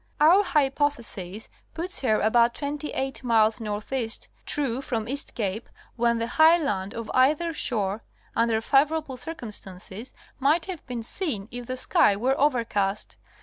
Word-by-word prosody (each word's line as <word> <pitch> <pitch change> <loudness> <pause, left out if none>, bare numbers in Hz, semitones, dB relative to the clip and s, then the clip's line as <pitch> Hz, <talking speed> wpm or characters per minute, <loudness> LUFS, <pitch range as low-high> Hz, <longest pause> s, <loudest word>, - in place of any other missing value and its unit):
Our 340 +7 +6
hypothesis 270 - -1 0.3
puts 355 +4 -2
her 220 -5 +2
about 235 +2 +3
twenty 295 +1 -3
eight 270 0 -3
miles 225 -1 +3
N.E. 220 +3 -3 0.4
true 270 -4 -1
from 230 -5 -3
East 280 +3 -3
Cape 215 -1 -3 0.3
when 235 0 +2
the 230 - -1
high 315 +7 +5
land 200 - -2
of 230 -2 -5
either 300 +6 +3
shore, 215 -7 -2 0.3
under 230 -1 +2
favorable 285 +3 +2
circumstances, 220 - -7 0.2
might 300 +5 +2
have 370 -5 -6
been 245 -3 -4
seen 225 - -2
even 245 0 -5
if 240 - -12
the 255 - -3
sky 210 -4 +3
were 250 +6 +1
overcast. 225 -8 0
245 Hz, 145 wpm, -26 LUFS, 220-290 Hz, 0.4 s, Our